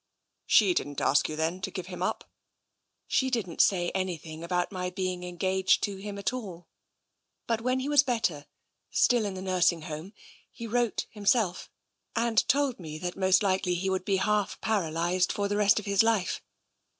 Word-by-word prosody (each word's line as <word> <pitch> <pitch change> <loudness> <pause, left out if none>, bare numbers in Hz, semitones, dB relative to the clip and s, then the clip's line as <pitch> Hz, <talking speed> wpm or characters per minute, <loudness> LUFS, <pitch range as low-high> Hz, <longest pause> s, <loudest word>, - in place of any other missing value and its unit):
She 200 -5 +5
didn't 145 -4 -2
ask 140 - +2
you, 155 - -4
then, 165 +4 -2
to 190 - -3
give 185 -2 -6
him 180 -1 -8
up? - - -2 0.4
" - - -53
She 260 - +3
didn't 220 -10 0
say 175 -3 +2
anything 170 -4 -4
about 180 +2 -1
my 180 -1 -3
being 185 -1 -3
engaged 185 +2 +1
to 200 -1 -2
him 200 +1 -7
at 200 +4 -1
all. 185 -9 -7 0.8
But 230 -1 -1
when 255 +2 0
he 265 - -3
was 290 -1 +6
better, 220 - -1 0.4
still 240 -4 +3
in 200 -2 -3
the 185 - -6
nursing 180 -3 +2
home, 155 +6 -7 0.4
he 235 - -8
wrote 235 0 0
himself, 205 -3 +1 0.5
and 230 -1 +2
told 275 -4 +1
me 155 -3 -7
that 175 +2 -4
most 190 0 +3
likely 185 -2 +1
he 190 +2 -1
would 190 -1 -1
be 195 0 +1
half 210 +1 0
paralysed 180 -3 0
for 200 0 -1
the 205 0 -1
rest 205 -1 +4
of 215 - -2
his 200 -1 +3
life. 225 -4 +1
190 Hz, 185 wpm, -28 LUFS, 180-215 Hz, 0.8 s, was